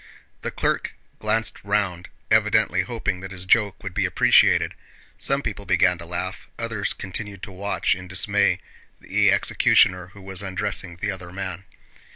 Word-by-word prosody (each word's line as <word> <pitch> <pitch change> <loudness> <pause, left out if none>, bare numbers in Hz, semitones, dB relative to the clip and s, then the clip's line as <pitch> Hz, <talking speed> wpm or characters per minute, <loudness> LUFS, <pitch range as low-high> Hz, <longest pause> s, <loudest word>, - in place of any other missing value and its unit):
The - - -3
clerk - - -1 0.2
glanced 110 +1 -1
round, 100 -4 -1 0.2
evidently - - +4
hoping 90 - -2
that 95 +1 -7
his 95 -1 -5
joke 100 0 +2
would 95 -2 -5
be 100 0 +1
appreciated. - - +4 0.5
Some - - 0
people - - -4
began 90 -1 +3
to 85 - -9
laugh, 90 +2 -4
others 115 -3 -2
continued 100 0 -5
to 100 - -6
watch 100 +2 0
in 90 0 -7
dismay 95 +1 +2 0.4
the - - +3
executioner 90 -1 +3
who 95 +1 -15
was 95 -1 -4
undressing 95 -2 -3
the 100 +4 -2
other 90 -2 -8
man. 95 0 -5
95 Hz, 155 wpm, -24 LUFS, 90-100 Hz, 0.5 s, evidently